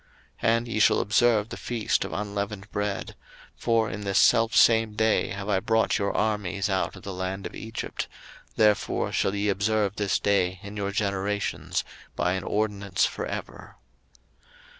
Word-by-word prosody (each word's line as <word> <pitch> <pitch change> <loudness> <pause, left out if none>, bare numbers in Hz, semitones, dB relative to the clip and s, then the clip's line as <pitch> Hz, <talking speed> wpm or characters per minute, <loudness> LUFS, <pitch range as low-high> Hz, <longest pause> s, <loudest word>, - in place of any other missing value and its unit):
02:012:017 - - +3
And 115 +1 -5
ye 115 -2 -2
shall 110 - +5
observe 110 +1 +3
the - - -6
feast 115 -3 -1
of - - -6
unleavened 100 0 -4
bread; 105 -1 -3 0.4
for 115 -2 +1
in 105 - -5
this 100 -1 -1
selfsame 115 -1 +5
day 110 0 +2
have 100 0 -5
I 100 -3 +2
brought 110 +3 +1
your 100 0 0
armies 105 -2 0
out 95 - -1
of - - -12
the 100 - -5
land 95 +1 -4
of - - -6
Egypt: 110 +1 -5 0.5
therefore 105 -1 +2
shall 95 - 0
ye 100 +1 0
observe 105 0 +1
this 100 -3 +1
day 95 -3 +1
in 100 +1 -8
your 100 -1 -2
generations 100 0 -1 0.3
by 90 - +1
an 95 -1 -3
ordinance 100 -2 0
for 475 - -3
ever. - - -7
105 Hz, 160 wpm, -26 LUFS, 100-110 Hz, 0.5 s, shall